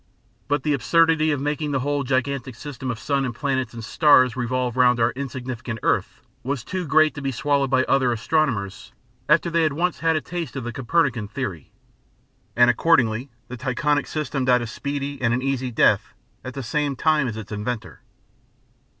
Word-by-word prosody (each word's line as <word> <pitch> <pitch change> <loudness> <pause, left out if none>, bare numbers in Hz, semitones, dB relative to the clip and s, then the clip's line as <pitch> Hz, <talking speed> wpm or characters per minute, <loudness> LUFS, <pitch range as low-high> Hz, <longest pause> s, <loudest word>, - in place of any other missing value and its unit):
But 145 -1 0
the 150 - +1
absurdity 155 +4 +3
of 145 -3 0
making 145 +1 -2
the 135 - 0
whole 145 +1 -1
gigantic 130 -1 -1
system 130 -1 -7
of 120 - -2
sun 140 +3 -1
and 125 -3 -3
planets 130 -2 -1
and 115 -1 -6
stars 130 -3 +4
revolve 125 -1 -1
round 125 -1 +4
our 115 +1 +3
insignificant 130 -3 -5
earth - - -1 0.2
was 135 -1 -3
too 180 +4 -4
great 155 +2 +4
to 140 - -7
be 135 -1 -1
swallowed 140 +2 0
by 130 -1 +3
other 130 -2 +2
astronomers 115 -4 -1 0.4
after 165 +3 +3
they 165 0 +2
had 155 -2 +2
once 175 +3 -1
had 165 -1 +2
a 155 - 0
taste 165 -1 -5
of 135 - -4
the 120 0 -5
Copernican 130 -4 0
theory; 100 - -5 0.8
and 120 0 +6
accordingly 125 -3 +2 0.2
the 125 - -7
Tychonic 135 +3 0
system 150 -3 -2
died 125 -1 +3
a - - -3
speedy 140 +4 -4
and 120 -1 +2
an 125 - -3
easy 135 -2 -1
death 115 - +2 0.3
at 130 +1 -7
the 135 - -4
same 145 +4 -1
time 150 -1 +2
as 110 -2 -4
its 110 -1 -8
inventor. 110 +2 -5
135 Hz, 185 wpm, -23 LUFS, 120-145 Hz, 0.8 s, and